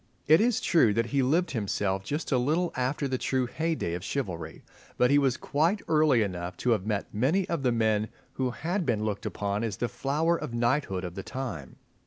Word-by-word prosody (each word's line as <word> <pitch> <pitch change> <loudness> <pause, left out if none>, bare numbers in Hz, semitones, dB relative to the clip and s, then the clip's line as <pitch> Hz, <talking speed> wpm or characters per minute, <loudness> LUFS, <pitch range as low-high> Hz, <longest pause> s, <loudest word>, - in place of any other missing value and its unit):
It 160 +5 +6
is 240 0 +2
true 120 - +3
that 115 0 +2
he 140 +3 +1
lived 160 +8 +2
himself 100 -4 -1
just 150 - -3
a 130 - +3
little 160 +8 0
after 130 +3 -1
the 130 -1 -2
true 130 -1 0
heyday 155 - -2
of 90 0 -4
chivalry; 90 - -4 0.3
but 125 +1 +4
he 145 - +6
was 135 -4 +2
quite 165 +8 0
early 150 -7 +4
enough 90 -2 -4
to 125 - +4
have 105 -3 +1
met 105 -2 -2
many 145 - +1
of 170 -4 -2
the 125 -2 +2
men 110 -2 +1 0.2
who 130 -1 -1
had 175 +9 -2
been 115 -7 0
looked 105 -2 -2
upon 100 +1 -2
as 110 -4 -3
the 120 - -1
flower 150 +8 0
of 120 -7 -5
knighthood 120 -5 0
of 90 -2 -5
the 95 - -5
time. 100 - -6
125 Hz, 210 wpm, -28 LUFS, 105-150 Hz, 0.3 s, It